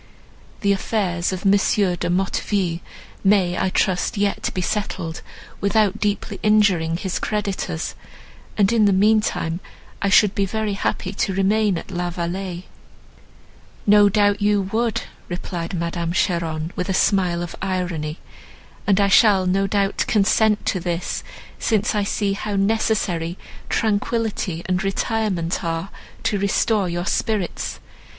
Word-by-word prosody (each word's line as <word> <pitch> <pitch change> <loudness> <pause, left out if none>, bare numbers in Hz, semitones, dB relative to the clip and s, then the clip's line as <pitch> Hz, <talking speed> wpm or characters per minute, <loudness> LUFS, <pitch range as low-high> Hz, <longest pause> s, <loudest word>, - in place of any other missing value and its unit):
The 200 -2 +2
affairs 185 -4 -1
of 185 +1 -5
M. 195 - +6
de 190 -3 +2
Motteville 185 -1 0 0.4
may, 190 -3 +3
I 190 - 0
trust, 185 +4 0
yet 200 0 0
be - - -4
settled 180 -4 -3 0.4
without 210 0 +2
deeply 205 0 -2
injuring 195 -6 +3
his 185 0 -3
creditors, 195 -5 -2 0.6
and 205 +1 +3
in 220 -2 +4
the 200 - +4
meantime 200 -4 +2 0.4
I 200 - +1
should 205 0 +5
be 200 -2 0
very 215 +1 -2
happy 195 -1 -2
to 195 -1 -1
remain 200 0 +2
at 165 - -8
La 175 -1 -2
Vallée." 175 +1 -4 1.2
"No 205 0 +6
doubt 205 0 +2
you 205 -1 +3
would," 230 -1 0 0.3
replied 175 0 -4
Madame 170 0 -2
Cheron, 165 -3 -1
with 180 - -3
a 190 - +1
smile 180 -4 +2
of 175 - -6
irony, 180 -5 -2 0.7
"and 200 -1 +4
I 200 - +4
shall 200 -2 +5
no 195 +2 +1
doubt 200 0 0
consent 215 0 +3
to 185 - 0
this, 175 0 -3 0.4
since 215 -2 +1
I 210 -1 +1
see 200 0 0
how 205 +1 -3
necessary 195 -4 0 0.3
tranquillity 210 -5 -1
and 185 +2 0
retirement 195 -3 -1
are 165 +2 -2 0.3
to 205 - 0
restore 200 0 +1
your 175 +1 -2
spirits. 205 -3 -1
195 Hz, 135 wpm, -22 LUFS, 175-210 Hz, 1.2 s, M